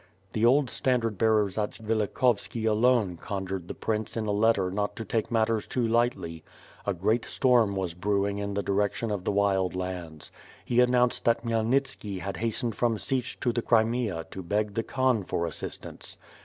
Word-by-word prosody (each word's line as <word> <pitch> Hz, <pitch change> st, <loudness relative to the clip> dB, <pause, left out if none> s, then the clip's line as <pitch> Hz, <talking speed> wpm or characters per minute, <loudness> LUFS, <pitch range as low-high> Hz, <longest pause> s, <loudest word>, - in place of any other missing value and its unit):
The 110 Hz, -, -1 dB
old 130 Hz, +2 st, +4 dB
standard 115 Hz, -6 st, 0 dB
bearer 110 Hz, -2 st, +4 dB
Zatsvilikhovski 110 Hz, +2 st, 0 dB
alone 110 Hz, -4 st, +3 dB
conjured 95 Hz, -1 st, -4 dB
the -, -, -6 dB
prince 110 Hz, 0 st, -2 dB
in 110 Hz, -, -1 dB
a 105 Hz, -, 0 dB
letter 100 Hz, -3 st, +2 dB
not 105 Hz, +1 st, -2 dB
to 115 Hz, -, -6 dB
take 110 Hz, +2 st, -1 dB
matters 115 Hz, -2 st, +1 dB
too 125 Hz, -2 st, 0 dB
lightly. 115 Hz, -9 st, 0 dB, 0.4 s
A 100 Hz, -, +2 dB
great 110 Hz, +7 st, +1 dB
storm 120 Hz, -6 st, +3 dB
was 95 Hz, -3 st, -2 dB
brewing 100 Hz, +2 st, 0 dB
in 100 Hz, 0 st, -3 dB
the 100 Hz, -, -1 dB
direction 105 Hz, +3 st, 0 dB
of 100 Hz, -3 st, -3 dB
the -, -, +1 dB
Wild 95 Hz, -2 st, +1 dB
Lands. 90 Hz, -4 st, -5 dB, 0.3 s
He 120 Hz, -, +1 dB
announced 125 Hz, 0 st, +3 dB
that 115 Hz, 0 st, +3 dB
Khymelnitski 115 Hz, -2 st, 0 dB
has 100 Hz, +1 st, -4 dB
hast 115 Hz, 0 st, -2 dB
ened 115 Hz, -, -1 dB
from 115 Hz, 0 st, +1 dB
Sich 130 Hz, +2 st, -2 dB
to 120 Hz, -, +1 dB
the 120 Hz, -, 0 dB
Crimea 110 Hz, -7 st, +1 dB
to 95 Hz, -, -6 dB
beg 105 Hz, +3 st, -1 dB
the 115 Hz, -, 0 dB
Khan 130 Hz, -3 st, +1 dB
for 85 Hz, -1 st, -2 dB
assist 80 Hz, -, -4 dB
ance." -, -, -7 dB
110 Hz, 180 wpm, -28 LUFS, 100-115 Hz, 0.4 s, old